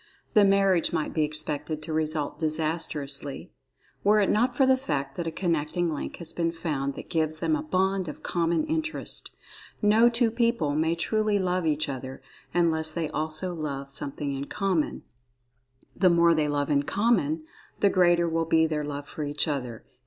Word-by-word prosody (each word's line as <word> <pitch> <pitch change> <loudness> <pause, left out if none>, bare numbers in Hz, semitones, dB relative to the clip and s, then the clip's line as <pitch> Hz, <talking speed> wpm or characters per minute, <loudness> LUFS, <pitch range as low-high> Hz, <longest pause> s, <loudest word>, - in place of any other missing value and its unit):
The 210 - +6
marriage 195 -3 +3
might 160 -2 -2
be 160 - +1
expected 150 0 -2
to 160 - -5
result 155 -1 -2
disastrously, 155 -3 -2 0.5
were 210 +1 +5
it 200 - +3
not 245 +3 +2
for 270 - +5
the 260 0 +5
fact 140 - -3
that 170 - -3
a - - -1
connecting 165 0 -1
link 150 - -5
has 170 -2 -10
been 165 -1 0
found 145 -5 -3
that - - -8
gives 155 -2 0
them 310 - +1
a 300 - -2
bond 190 - 0
of 150 - -8
common 170 - +1
interest. 320 +1 -3 0.5
No 220 +3 +5
two 235 -1 +1
people 230 - +1
may 160 +2 +1
truly 215 +4 +1
love 180 -3 0
each 155 0 0
other, 130 -1 -6 0.3
unless 160 -2 +2
they 160 -1 -2
also 155 +4 -2
love 140 -4 -5
something 140 +1 -1
in 135 +1 -4
common—the 185 -2 -1 1.1
more 170 -1 +5
they 155 -2 +1
love 145 0 -1
in 140 -1 +3
common, 165 -4 +1 0.4
the 200 - +4
greater 175 -2 +4
will 165 0 0
be 160 0 +3
their 155 -2 -1
love 145 0 -5
for 155 - -5
each 145 +1 -1
other. 125 -6 -4
160 Hz, 175 wpm, -27 LUFS, 150-190 Hz, 1.1 s, The